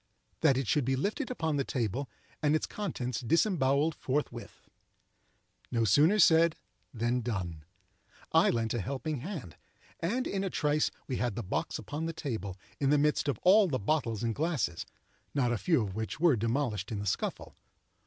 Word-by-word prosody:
that 140 -5 +4
it 135 -3 -1
should 150 - +2
be 130 +2 +1
lifted 200 - -2
upon 160 - -1
the 140 - +1
table 125 +1 -2 0.3
and 150 0 +3
its 155 - 0
contents 130 - -3
disembowelled 155 - +2
forthwith. 145 +2 -4 1.0
No 115 -1 +1
sooner 150 - +5
said 165 -3 +5 0.4
than 120 +1 0
done. 90 -9 -4 0.7
I - - +5
lent 115 -1 0
a 120 - -1
helping 140 - -3
hand; 140 - -7 0.4
and, 235 +10 -1
in 195 -1 -2
a 195 - -1
trice 150 -2 +1 0.2
we 130 - -2
had 120 -4 -1
the 120 - -3
box 95 - -2
upon 155 +3 -4
the 165 - -3
table, 110 - -4 0.2
in 140 - +2
the 150 - +5
midst 150 0 +2
of 140 - 0
all 200 +2 +6
the 140 -6 0
bottles 115 -2 -1
and 115 -1 0
glasses, 140 - -1 0.5
not 125 -4 +2
a - - 0
few 160 -9 +2
of 100 -3 -4
which 110 +7 -4
were 165 -4 +5
demolished 115 -3 -1
in 110 - -2
the 100 - -4
scuffle. 100 - -3
135 Hz, 175 wpm, -30 LUFS, 115-160 Hz, 1.0 s, all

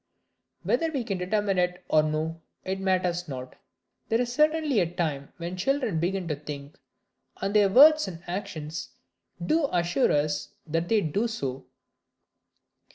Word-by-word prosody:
Whether 325 -1 +1
we 275 -5 -2
can 195 -4 -3
determine 195 +1 0
it 180 0 -1
or 155 - +4
no, 155 +2 -2 0.2
it 190 +1 -2
matters 180 -2 0
not, 130 -3 -7 0.5
there 225 - +2
is 245 -1 -1
certainly 305 -3 +3
a 170 -2 0
time 150 -6 -2
when 170 +1 -5
children 220 - 0
begin 180 +1 -1
to 150 - 0
think, 145 0 -9 0.6
and 195 +1 -2
their 205 -2 +5
words 300 +5 +7
and 170 -2 -8
actions 170 -4 -5 0.6
do 310 - +2
assure 175 +8 +2
us 150 0 -1
that 165 +1 -2
they 220 -2 +4
do 200 +8 0
so. 135 - -4
180 Hz, 150 wpm, -27 LUFS, 160-215 Hz, 0.6 s, words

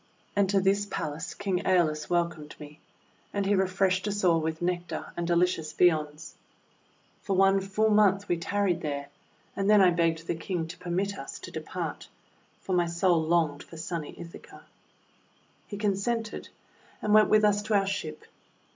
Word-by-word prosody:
And 200 -2 +2
to 200 0 +3
this 200 +2 +1
palace 160 0 -4
King 195 -3 -1
^Eolus 160 -5 +1
welcomed 170 -3 -1
me, 150 0 -11 0.5
and 200 -1 -1
he 200 - +2
re 190 -1 +2
freshed 185 +1 +1
us 205 0 -2
all 165 -3 +4
w^ith 160 0 -3
Nectar 175 0 -3
and 170 -1 -3
delicious 170 -2 +1
viands. 155 -3 +1 0.9
For 195 - -1
one 195 +1 +4
full 210 +3 +1
month 205 -1 +3
we 175 - +1
tarried 180 0 0
there; 140 -2 -4 0.5
and 200 0 0
then 210 -1 +7
I 185 -2 +6
begged 165 -1 0
the - - -1
King 165 0 -3
to 175 - -8
permit 190 +3 -2
us - - -7
to - - -9
depart, - - -5 0.5
for 190 - -3
my 175 -1 +2
soul 170 0 +2
longed 160 -3 +1
for 165 - -12
sunny 165 -1 -5
Ithaca. 170 0 -11 1.0
He 205 - -6
consented, 210 +2 -2 0.5
and 210 - 0
went 215 0 +6
with 215 0 +5
us 205 0 +3
to 215 0 -1
our 195 -1 +3
ship. 180 -6 -4
180 Hz, 170 wpm, -28 LUFS, 165-200 Hz, 1.0 s, then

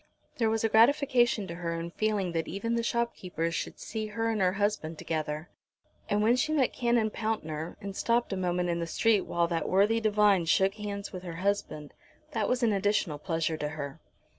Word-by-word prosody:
There 225 -2 +3
was 225 0 0
a - - +4
gratification 240 -2 +4
to 170 - -6
her 170 -1 -3
in 170 +1 -5
feeling 205 -3 0
that 165 -1 -2
even 215 +5 -2
the 235 - +1
shopkeepers 195 -8 -2
should - - -4
see 220 -1 -4
her 225 +2 -1
and 215 -2 -1
her 185 -1 +3
husband 195 -6 -1
together. 155 0 -3 0.6
And 205 +1 +2
when 230 +3 +4
she 310 +5 0
met 275 -5 +2
Canon 235 -3 +1
Pountner 165 -9 -3
and 195 -1 -6
stopped 235 -1 +1
a - - 0
moment 180 -1 0
in 170 0 0
the 170 - -2
street 215 +4 +2
while 170 0 +1
that 165 -2 -1
worthy 205 +4 +3
divine 210 -4 +3
shook 190 +4 +3
hands 205 -1 -6
with 185 - -5
her 175 -2 -7
husband, 180 -5 -2 0.4
that 220 -3 -1
was 250 0 +1
an 225 -3 +3
additional 195 -6 0
pleasure 165 -1 -1
to 150 -1 -2
her. 140 -2 -5
200 Hz, 200 wpm, -29 LUFS, 170-225 Hz, 0.6 s, a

